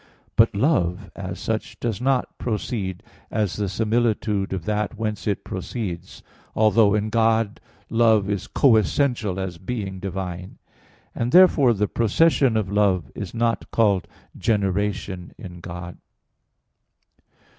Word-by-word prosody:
But - - +4
love, 100 - +1
as - - -6
such, - - -3
does 115 -2 -2
not 130 -1 0
proceed 105 -5 -3 0.3
as 105 -4 -1
the 100 -2 -1
similitude 110 -1 0
of 95 -4 -4
that 105 +1 -1
whence 110 -1 -3
it 100 - -1
proceeds; 95 -2 -6 0.3
although 110 -1 +4
in 105 +1 0
God 115 -1 +2 0.3
love 110 -3 +3
is 100 -2 -2
co 125 -5 +4
essential 110 -4 0
as 90 -3 -4
being 95 -1 -4
divine; 90 -1 -5 0.6
and 120 +1 -2
therefore 145 -9 +6
the 105 +1 0
procession 120 +2 +2
of 100 -3 -2
love 95 -7 +1
is 100 +1 -7
not 115 0 0
called 100 -5 +2 0.3
generation 100 -3 -1
in 90 -5 -9
God. 85 0 -8
105 Hz, 125 wpm, -23 LUFS, 95-115 Hz, 0.6 s, therefore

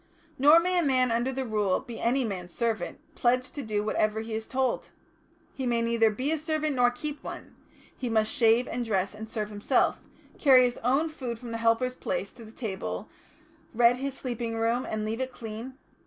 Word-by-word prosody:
Nor 295 +5 +8
may 360 +1 +1
a - - +2
man 255 -4 +2
under 235 +3 +1
the 265 0 -3
Rule 210 -4 +1
be 240 -3 -9
any 255 +3 +2
man's 180 -4 -5
servant, 230 +2 -2 0.2
pledged 250 +2 +1
to 285 - -4
do 210 -4 -1
whatever 215 0 0
he 225 0 -6
is 220 0 -3
told. 260 -2 -1 0.6
He 265 -2 -3
may 235 -1 +1
neither 230 -1 +3
be 255 +8 -2
a 320 - 0
servant 310 -1 -1
nor 245 0 +5
keep 290 +4 -6
one; - - -8 0.4
he 250 - -4
must 220 -1 +2
shave 230 +1 +4
and 245 +1 -2
dress 195 -4 0
and 220 +1 -8
serve 215 -2 -3
himself, 210 +5 +1 0.4
carry 260 -4 +7
his 245 -1 0
own 275 +7 +2
food 255 -7 -5
from 235 0 -8
the 230 - -3
helper's 230 +2 +2
place - - -3
to 235 - -12
the 220 - -12
table, 190 - -5 0.7
redd 240 +1 +5
his 270 +1 -3
sleeping 235 -3 -4
room, 230 +2 0
and 215 0 -2
leave 225 +3 -2
it 260 0 -2
clean...." 230 +3 -7
235 Hz, 200 wpm, -28 LUFS, 220-260 Hz, 0.7 s, Nor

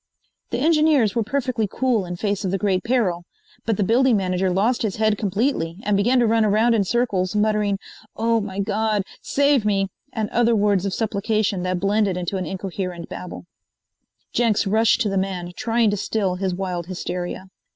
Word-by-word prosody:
The 235 - -2
engineers 300 -6 +3
were 230 - +1
perfectly 245 -1 -1
cool 240 -8 0
in 175 - -4
face 205 +2 -2
of 190 - -1
the 195 - 0
great 190 -2 0
peril, 225 -8 +1 0.5
but 225 -3 +1
the 205 - +1
building 235 +3 +3
manager 185 -1 0
lost 210 +7 +1
his 210 -5 -1
head 215 -1 +2
completely 200 -4 -1
and 210 0 +1
began 235 +6 +3
to 245 - +4
run 225 0 +3
around 215 +3 +3
in 215 -3 +2
circles 195 -4 0
muttering: 210 -1 +1 0.4
"Oh, 230 0 +1
my 195 -2 -6
God, 210 +1 0 0.2
save 280 -3 +2
me!" 195 -2 +1 0.2
and 220 -3 -2
other 235 0 +3
words 200 -2 +2
of 195 - -3
supplication 215 -2 0
that 185 0 -1
blended 200 0 +1
into 180 +2 -2
an 185 -3 -3
incoherent 180 -1 -5
babel. 180 0 -8 0.9
Jenks 230 -3 +2
rushed 220 +4 +3
to 215 - +1
the 195 -1 0
man, 185 -2 -3
trying 230 -2 +1
to 205 - -1
still 195 -2 -1
his 185 0 -2
wild 180 -2 -4
hysteria. 180 0 -5
205 Hz, 180 wpm, -22 LUFS, 190-225 Hz, 0.9 s, to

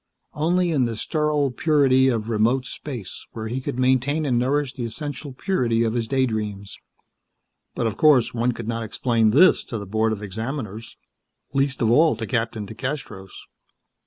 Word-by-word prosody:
Only 175 +3 +1
in 135 -5 +2
the 115 -2 -3
sterile 150 +1 0
purity 135 -2 +3
of 115 -4 0
remote 115 +4 +1
space 125 -7 -7
where 110 -1 -5
he 125 +4 -3
could 125 - -4
maintain 130 +4 +1
and 125 -4 +1
nourish 135 +1 0
the 125 - -5
essential 140 +5 -5
purity 125 - 0
of 115 -1 0
his 115 -2 -1
day 130 +2 +2
dreams. 105 -4 -4 1.0
But 120 - -1
of 110 -2 -2
course 130 -7 +4
one 120 +1 +1
could 115 -1 -7
not 115 0 -2
explain 115 0 +1
this 175 +12 +5
to 115 - -5
the 100 - -6
Board 110 +3 0
of 105 -1 -4
Examiners; 110 +1 -6 0.6
least 135 -2 0
of 115 - +3
all 155 +2 +5
to 110 0 -5
Captain 115 -2 -2
DeCastros. 110 -4 -6
120 Hz, 170 wpm, -23 LUFS, 110-140 Hz, 1.0 s, this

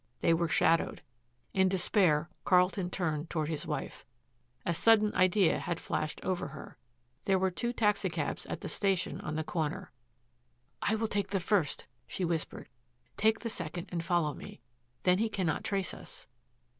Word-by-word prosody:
They 165 - +4
were 170 +1 +1
shadowed. 165 +1 +2 0.5
In 190 -1 +4
despair 175 -4 +3 0.2
Carlton 180 0 +3
turned 160 -4 -2
toward 155 -2 -1
his 155 -2 -3
wife. - - -4 0.6
A 170 - +1
sudden 215 +3 +4
idea 185 0 +4
had 170 - -3
flashed 155 - -2
over 185 -2 -1
her. - - -10 0.5
There 195 -1 +3
were 190 0 +1
two 235 +7 -2
taxicabs 210 -4 0
at - - -5
the - - -5
station 195 -3 0
on 155 - -4
the 155 - -1
corner. 165 +4 -3 0.9
"I 220 - +2
will 220 0 0
take 200 -2 -1
the 195 0 0
first," 175 -4 +1 0.2
she 185 - -2
whispered. 165 -2 -3 0.5
"Take 220 +1 +2
the 230 - -3
second 175 -2 -5
and 170 -2 -2
follow 170 -4 +1
me. - - -10 0.4
Then 180 +1 +4
he 225 +1 +1
cannot 180 -7 -1
trace 195 -3 -1
us." - - -10
180 Hz, 160 wpm, -31 LUFS, 165-200 Hz, 0.9 s, They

